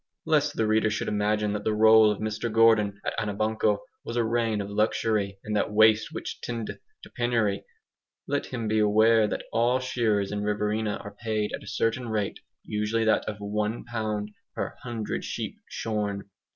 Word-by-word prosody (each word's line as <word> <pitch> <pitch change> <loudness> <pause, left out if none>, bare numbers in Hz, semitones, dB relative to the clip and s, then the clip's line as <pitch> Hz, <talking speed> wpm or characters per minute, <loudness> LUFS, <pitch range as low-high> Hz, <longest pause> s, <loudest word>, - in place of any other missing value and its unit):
Lest 150 -2 +2
the 110 - +1
reader 110 0 +3
should 105 - -2
imagine 105 0 +1
that 105 -1 -3
the 110 - 0
role 110 0 +7
of 105 - 0
Mr 110 +2 -2
Gordon 110 -3 +4
at - - -1
Anabanco 110 0 0 0.2
was 115 - -5
a 120 - +3
reign 115 -1 0
of 100 - -3
luxury 105 -1 0
and 105 0 -3
that 105 - +1
waste 110 +1 +5
which - - -6
tendeth 115 -2 -5 0.2
to - - -12
penury, 115 -5 0 0.6
let 145 0 -1
him 115 -3 -4
be 110 0 +2
aware 110 +1 +5
that - - -3
all 120 +3 +3
shearers 110 -6 0
in 105 0 -2
Riverina 105 +1 0
are 105 0 -9
paid 110 -2 -1
at - - -4
a 105 - -13
certain 115 +3 -1
rate, 105 -2 -2 0.2
usually 105 +2 -1
that 110 - +3
of 105 - -4
ONE 105 +2 -2
pound 110 -3 -3 0.2
per - - -3
hundred 115 -3 -4
sheep - - -5
shorn. 100 -2 -3
110 Hz, 180 wpm, -27 LUFS, 105-115 Hz, 0.6 s, role